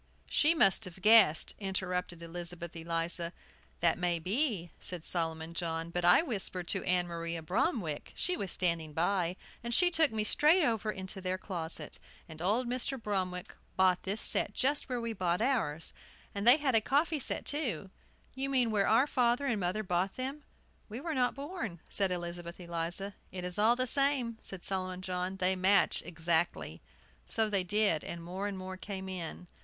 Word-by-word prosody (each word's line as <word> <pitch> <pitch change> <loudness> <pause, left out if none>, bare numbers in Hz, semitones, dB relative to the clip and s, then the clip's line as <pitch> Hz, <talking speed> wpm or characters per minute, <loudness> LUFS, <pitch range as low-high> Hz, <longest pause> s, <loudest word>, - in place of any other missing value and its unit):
"She 315 +3 +4
must 205 -6 +4
have 185 0 -10
guessed," 215 -8 +6
interrupted 180 -3 -3
Elizabeth 170 0 -4
Eliza. 170 +1 -2 0.5
"That 170 0 +3
may 175 -1 +1
be," 195 - -1
said 175 -3 -2
Solomon 165 -1 0
John. 165 -1 -3
"But 175 0 -2
I 175 - +6
whispered 190 - -2
to - - +2
Ann 180 -1 +2
Maria 170 -1 -4
Bromwick, 180 - -1
she 360 - 0
was 195 - -4
standing 170 -4 0
by, 175 +1 0 0.3
and 235 0 0
she 360 -1 +6
took 320 -3 +4
me 220 -1 -1
straight 305 - +4
over 225 -3 0
into 190 -1 -6
their 185 0 -2
closet, 165 -5 -4 0.3
and 160 -1 -10
old 220 +8 +1
Mr. 255 +2 -1
Bromwick 185 -4 -3 0.2
bought 185 -1 +3
this 200 +3 -1
set 205 - +2
just 285 +2 0
where 250 -1 -2
we 230 -1 -3
bought 180 -3 0
ours. 215 - +1 0.4
And 200 +2 -2
they 250 +4 +10
had 285 -4 0
a 225 - +4
coffee 295 +6 +1
set, - - +2
too" 230 - -2 0.4
"You 270 +1 -3
mean 250 -4 +2
where 200 -2 +2
our 230 +5 +4
father 250 -1 +1
and 235 -6 0
mother 185 +4 -1
bought 185 0 -1
them. 270 +3 -4 0.5
We 220 +3 -6
were 320 +3 -4
not 250 -3 +1
born," 280 - -6
said 195 -2 +1
Elizabeth 175 0 -5
Eliza. 175 +3 -3 0.2
"It 180 -1 -5
is 180 +2 +3
all 225 +3 +5
the 255 +1 0
same," 260 -4 +1
said 190 -2 -5
Solomon 185 -1 -3
John. 185 0 -3
"They 190 0 +2
match 190 +2 +3
exactly." 165 0 -1 0.5
So 220 -1 0
they 195 -2 +2
did, 200 -4 +1
and 170 -1 -6
more 185 +4 -4
and 200 -2 -5
more 185 0 -7
came 190 -1 -6
in. 180 -2 -6
190 Hz, 180 wpm, -31 LUFS, 175-235 Hz, 0.5 s, they